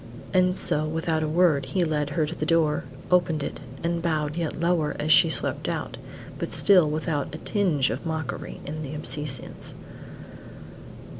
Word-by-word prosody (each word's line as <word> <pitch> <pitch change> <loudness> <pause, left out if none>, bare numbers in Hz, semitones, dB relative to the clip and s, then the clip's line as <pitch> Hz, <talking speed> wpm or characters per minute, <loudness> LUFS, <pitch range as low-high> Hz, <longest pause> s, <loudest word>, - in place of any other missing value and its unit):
And 185 0 +3
so 155 +1 +3
without 160 0 -1
a 155 - 0
word 160 -3 +3
he 185 - 0
led 150 -3 -1
her 155 +2 0
to 155 - -5
the - - -5
door, 160 -4 +2 0.3
opened 165 -4 +2
it, - - -5 0.2
and 170 0 -1
bowed 155 -3 -1
yet 165 -2 -3
lower 170 -3 +1
as 155 +1 -1
she 170 0 +7
swept - - 0
out, - - -4 0.4
but - - -3
still 180 -6 +5
without 155 -1 -2
a - - -5
tinge 160 -8 +1
of - - -4
mockery 160 -2 -4
in 155 +2 -5
the 150 0 -6
obeisance. 145 -2 -4
155 Hz, 165 wpm, -25 LUFS, 150-170 Hz, 0.4 s, she